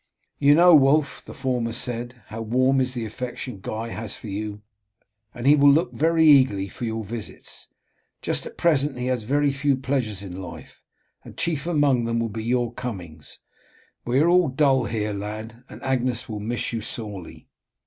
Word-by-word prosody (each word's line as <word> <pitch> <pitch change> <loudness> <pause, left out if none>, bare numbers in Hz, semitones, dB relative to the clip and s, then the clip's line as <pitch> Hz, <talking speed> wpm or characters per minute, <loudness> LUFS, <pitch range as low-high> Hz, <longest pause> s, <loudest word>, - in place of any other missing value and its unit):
"You 145 0 +6
know, 175 +2 +7
Wulf," 140 0 +4
the - - -10
former 125 -3 -1
said, 120 0 -5
"how 110 +1 -6
warm 130 +4 +2
is 130 0 -1
the 120 -2 -3
affection 125 -1 -6
Guy 110 +4 -4
has 115 -1 -5
for 110 - -9
you, 105 +1 -5 0.7
and 120 0 -8
he 145 +2 +7
will 145 -1 +6
look 165 +5 +2
very 160 +1 +3
eagerly 130 -10 +5
for 120 - -6
your 110 -1 -3
visits. 110 +1 -8 0.6
Just - - -1
at - - -12
present 145 -5 +2
he 125 - -3
has 125 -2 0
very 145 +5 +1
few 140 0 +1
pleasures 125 -7 -2
in 95 -1 -7
life, 90 - -11 0.4
and - - -13
chief 165 -2 -1
among 145 -7 +2
them 115 0 0
will 115 0 -1
be 110 +1 -5
your 120 0 0
comings. 90 -12 -7 0.7
We 125 +3 +1
are 160 - +4
all 180 0 +5
dull 135 -2 +2
here, 105 -1 -2
lad, 110 +4 -6
and - - -11
Agnes 125 -3 -1
will 110 -2 -5
miss 115 +3 -2
you 115 - -2
sorely." 105 -6 -6
125 Hz, 180 wpm, -24 LUFS, 110-140 Hz, 0.7 s, know